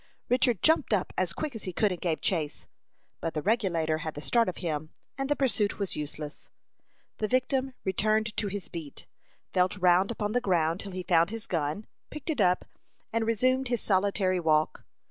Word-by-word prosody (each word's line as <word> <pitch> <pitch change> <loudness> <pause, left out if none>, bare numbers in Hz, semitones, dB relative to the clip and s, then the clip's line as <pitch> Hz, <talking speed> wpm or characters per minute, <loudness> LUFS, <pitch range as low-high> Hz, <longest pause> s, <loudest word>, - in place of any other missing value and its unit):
Richard 245 -4 +3
jumped 315 -7 +4
up 190 -3 0
as 185 -2 +1
quick 295 - -4
as 225 - -5
he 185 - -4
could 210 +3 +2
and 180 - -5
gave 165 -3 -1
chase. 160 -6 -1 0.5
But 165 - -3
the 155 - 0
Regulator 170 -7 +1
had 155 -1 -5
the - - -5
start 230 +4 +3
of 180 - -6
him, 155 -3 -3 0.3
and 270 0 -3
the 290 - +3
pursuit 230 -7 +1
was 200 -2 -2
useless. 150 0 -6 0.7
The 215 - 0
victim 255 +2 0
returned 215 +3 +1
to 210 - 0
his 200 -3 -4
beat, 160 -5 -8 0.5
felt 185 +2 +2
round 180 +1 +4
upon 210 -3 -2
the 245 +2 +1
ground 170 -5 +1
till 200 - -5
he 185 0 -4
found 170 -1 +4
his 225 0 -5
gun, 165 +5 -2 0.2
picked 300 +2 -4
it 275 -8 0
up, 180 -1 +3 0.5
and 225 -1 +1
resumed 255 +4 +2
his 240 -1 0
solitary 190 -1 +2
walk. 155 -2 +1
195 Hz, 190 wpm, -29 LUFS, 170-230 Hz, 0.7 s, jumped